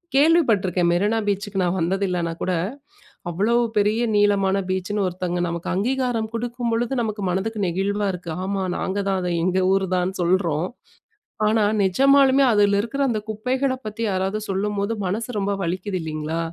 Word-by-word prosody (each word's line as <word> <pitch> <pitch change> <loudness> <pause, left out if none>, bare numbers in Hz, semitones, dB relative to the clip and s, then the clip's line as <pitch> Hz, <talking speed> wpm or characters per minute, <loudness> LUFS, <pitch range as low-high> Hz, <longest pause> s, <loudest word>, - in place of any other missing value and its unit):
கேள்வி 325 +5 +6
பட்டுருக்கேன். 185 -5 +2
மெரினா 205 +6 +1
பீச்சுக்கு 200 0 -1
நான் 180 +1 0
வந்தது 190 +4 0
இல்லைன்னா 175 -2 -1
கூட, 185 - 0 0.8
அவ்வளவு 220 +8 +2 0.2
பெரிய 210 +3 +2
நீளமான 200 -2 +3
பீச்சுன்னு 190 +2 -1
ஒருத்தங்க 180 0 -3
நமக்கு 170 0 -4
அங்கீகாரம் 245 +1 0
குடுக்கும்பொழுது 235 0 -2
நமக்கு 215 -2 -3
மனதுக்கு 205 +4 -2
நெகிழ்வா 200 +4 -1
இருக்கு. 180 -1 -7
ஆமா 195 0 -2 0.2
நாங்க 190 +2 -2
தான், 195 -1 +1
அத 180 - -1
எங்க 185 +1 +1
ஊர் 195 0 +2
தான்ன்னு 185 +1 -1
சொல்றோம். 175 -2 +1 0.8
ஆனா, 215 0 +3 0.2
நிஜமாலுமே 275 +7 +4
அதில 205 -1 +4
இருக்கிற 235 +6 -4
அந்த 225 -3 0
குப்பைகளைப் 255 +4 -1
பத்தி 215 +2 -5
யாராவது 190 +2 -1
சொல்லும்போது 200 +2 -1
மனசு 220 +6 -2
ரொம்ப 200 0 0
வலிக்குது 185 +2 -2
இல்லைங்களா? 155 0 -3
200 Hz, 150 wpm, -22 LUFS, 185-225 Hz, 0.8 s, கேள்வி